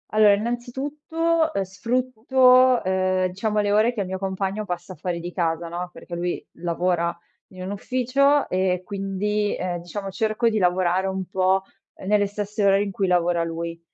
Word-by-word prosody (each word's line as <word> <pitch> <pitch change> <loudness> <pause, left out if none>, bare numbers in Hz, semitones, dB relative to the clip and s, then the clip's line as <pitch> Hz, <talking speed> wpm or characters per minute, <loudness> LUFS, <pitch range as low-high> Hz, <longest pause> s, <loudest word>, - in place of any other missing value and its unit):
Allora, 215 -1 +5
innanzitutto, 290 +9 -1
ehm 195 - 0
sfrutto, 255 +5 +3
ehm, 185 0 +1
diciamo 210 +4 -1
le 205 0 0
ore 215 +4 +3
che 220 - -2
il 190 - -3
mio 190 0 -3
compagno 195 +2 -3
passa 180 -1 -5
fuori 170 +3 -3
di 175 +1 -6
casa, 170 -1 -1
no, 175 +1 -4
perché 170 - -8
lui 175 +1 -3
lavora 170 0 -1 0.4
in 185 0 -8
un 185 - -4
ufficio 255 +6 +2
e 185 -1 +1
quindi 205 +1 -1
ehm 180 -1 -3
diciamo 195 +3 -6
cerco 220 +4 +1
di 220 - -1
lavorare 185 0 +2
un 190 0 -3
po' 190 +1 +2 0.4
nelle 205 0 +3
stesse 205 +1 -3
ore 195 0 +4
in 200 - -4
cui 195 0 -1
lavora 175 -1 +2
lui 165 0 -4
195 Hz, 170 wpm, -23 LUFS, 180-220 Hz, 0.4 s, Allora